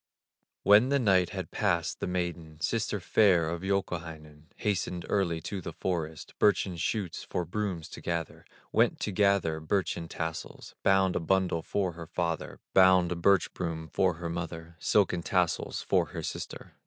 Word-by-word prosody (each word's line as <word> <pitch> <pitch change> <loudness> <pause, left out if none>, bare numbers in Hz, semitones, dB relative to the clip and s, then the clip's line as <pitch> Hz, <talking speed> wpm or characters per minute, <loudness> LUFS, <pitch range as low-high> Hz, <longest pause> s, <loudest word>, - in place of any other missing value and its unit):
When 105 +6 +6
the 140 - +3
night 95 -8 +3
had - - -6
passed, 85 -2 0
the - - -2
maiden, 85 -3 -3
Sister 75 - -1
fair 90 -7 +4
of 85 +1 -3
Youkahainen, 80 -6 -3
Hastened 90 -4 -2
early 85 -5 +1
to 100 +2 -5
the 85 - -6
forest, 80 -4 -3
Birchen 100 -3 +3
shoots 90 +1 -2
for 90 - -3
brooms 90 -3 -3
to - - -9
gather, 85 -3 -3 0.3
Went - - +3
to 105 - -1
gather 100 -5 +2
birchen 85 0 -1
tassels; 80 0 -6
Bound 95 -1 +3
a - - +2
bundle 90 0 +1
for 95 +1 -1
her 85 -1 -9
father, 85 -2 -3
Bound 95 -2 +6
a - - 0
birch 95 +3 +3
broom 80 -3 -4
for 95 -3 +2
her 85 +1 -5
mother, 85 0 -5
Silken 95 -4 +2
tassels 90 -1 0
for - - +2
her - - -6
sister. - - -6
90 Hz, 160 wpm, -29 LUFS, 80-95 Hz, 0.3 s, When